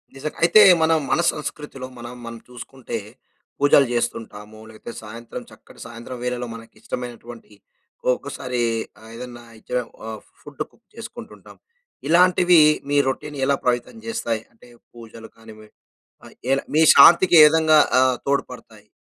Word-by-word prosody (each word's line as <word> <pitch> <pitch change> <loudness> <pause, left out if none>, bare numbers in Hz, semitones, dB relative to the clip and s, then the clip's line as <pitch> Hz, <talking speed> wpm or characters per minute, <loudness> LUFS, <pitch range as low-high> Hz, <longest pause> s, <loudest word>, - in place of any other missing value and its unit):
నిజంగ. 150 +3 -6
అయితే 175 +6 +6 0.2
మనం 160 0 +3
మన 170 - +2
సంస్కృతిలో, 150 -3 -7
మనం 120 +1 -9
మనని 115 -1 -9
చూసుకుంటే, 125 0 -8 0.6
పూజలు 140 0 +5
జేస్తుంటాము, 110 -3 -5
లేకపోతే 110 +2 -11
సాయంత్రం 115 +2 -9
చక్కటి - - -18
సాయంత్రం 115 +2 -9
వేళలో 125 0 -3
మనకి 115 0 -14
ఇష్టమైనటువంటి 120 -2 -8 0.6
ఒక్కసారి 125 -3 -5 0.4
ఆహ్, 110 - -14
ఏదన్నా 120 0 -10 0.2
ఇ - - -26
చేయము 125 -2 -3 0.2
ఆహ్, 110 -1 -7 0.2
ఫుడ్ - - -11
కుక్ - - -30
చేసుకుంటుంటాం. - - -12 0.5
ఇలాంటివి 180 0 +5 0.3
మీ 145 - +1
రొటీన్ 145 +2 -4
ఎలా 140 +1 +2
పవితం 120 - -1
జేస్తాయి, 120 - -3
అంటే 115 - -21 0.2
పూజలు 115 -1 -13
కానివండీ 110 -1 -15 0.5
ఆహ్, - - -16 0.2
ఎలా 135 0 +1
మీ 160 - +5
శాంతికి 170 +4 +7
ఏ - - +10
విధంగా 155 0 +4 0.2
ఆహ్, 130 -1 +2
తోడ్పడతాయి. 115 -6 -4
125 Hz, 135 wpm, -21 LUFS, 115-145 Hz, 0.6 s, ఏ